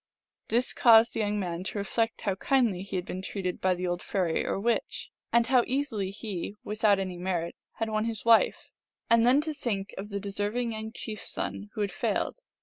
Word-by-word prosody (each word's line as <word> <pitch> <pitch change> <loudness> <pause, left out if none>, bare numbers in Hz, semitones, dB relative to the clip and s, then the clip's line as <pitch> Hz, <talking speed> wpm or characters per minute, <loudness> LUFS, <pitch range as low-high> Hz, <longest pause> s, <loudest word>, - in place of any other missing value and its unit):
This 240 +3 +1
caused 230 -1 +6
the - - -3
young 210 -1 0
man 175 -2 -3
to 210 - -4
reflect 225 +3 -1
how 200 -3 0
kindly 225 -2 +1
he 195 0 -6
had 180 -1 -1
been 185 - -5
treated 190 -1 -4
by 185 -1 +3
the 180 +1 -3
old 175 0 -1
fairy 180 -5 0
or - - -1
witch, 235 +3 -1 0.2
and 235 0 +4
how 250 0 +4
easily 255 -8 -1
he, 200 -1 -5
without 210 -1 +2
any 185 -2 -3
merit, 175 -2 -2 0.2
had 225 - -2
won 215 0 0
his 225 -2 -3
wife, 230 -1 +4 0.4
and 230 0 +6
then 265 +4 +6
to 310 0 -3
think 210 -8 -3
of 205 +2 -6
the 200 -1 -3
deserving 205 +4 -2
young 220 0 -5
chief 220 -2 -6
s - - -6
son 205 - -4
who 215 - -2
had 200 -2 0
failed. 195 - -1
210 Hz, 210 wpm, -28 LUFS, 190-230 Hz, 0.4 s, caused